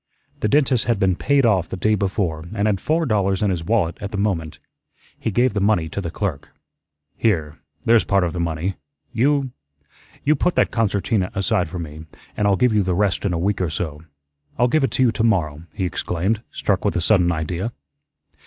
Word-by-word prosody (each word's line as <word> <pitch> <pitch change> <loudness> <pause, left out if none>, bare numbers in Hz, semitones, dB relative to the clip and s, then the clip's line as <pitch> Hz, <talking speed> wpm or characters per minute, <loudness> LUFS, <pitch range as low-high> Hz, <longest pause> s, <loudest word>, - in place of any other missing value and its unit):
The - - 0
dentist 130 -1 +2
had 115 -4 +1
been 95 -2 +2
paid 140 +5 +2
off 95 -7 +2
the - - -4
day 110 +4 +2
before 95 -5 -1
and 100 - 0
had 105 -3 +1
four 160 +2 +1
dollars 100 -5 +1
in 100 - +2
his 85 -3 -2
wallet 100 -4 0
at 100 - -4
the 105 - -3
moment. 90 -7 -1 0.6
He - - -3
gave 120 +3 +2
the 105 - 0
money 95 -6 +2
to 100 - -4
the 85 - -4
clerk. 90 -4 -4 0.7
"Here, 80 -9 0 0.3
there's 115 -1 +5
part 100 -2 +2
of 85 - -1
the 90 - -4
money. 85 +3 -2 0.4
You 135 +2 +2 0.7
you 150 +2 +3
put 175 +5 0
that - - +2
concertina 100 -3 0
aside 90 -3 +1
for 90 - -6
me, 80 -1 -7 0.3
an' 105 - +1
I'll 100 - +4
give 125 +2 +2
you 105 - +3
the 95 -2 0
rest 100 0 +1
in 100 - +1
a 85 - -1
week 95 +3 0
or 90 - 0
so 75 -1 -4 0.6
I'll 120 - +4
give 150 +4 +2
it 135 - +2
to 130 +1 +1
you 120 - +4
tomorrow," 85 -10 0
he 95 - -3
exclaimed, 90 +5 -1
struck 95 -2 -1
with 105 - 0
a 90 - +1
sudden 90 -1 +3
idea. 85 +7 -2
100 Hz, 210 wpm, -21 LUFS, 85-110 Hz, 0.7 s, there's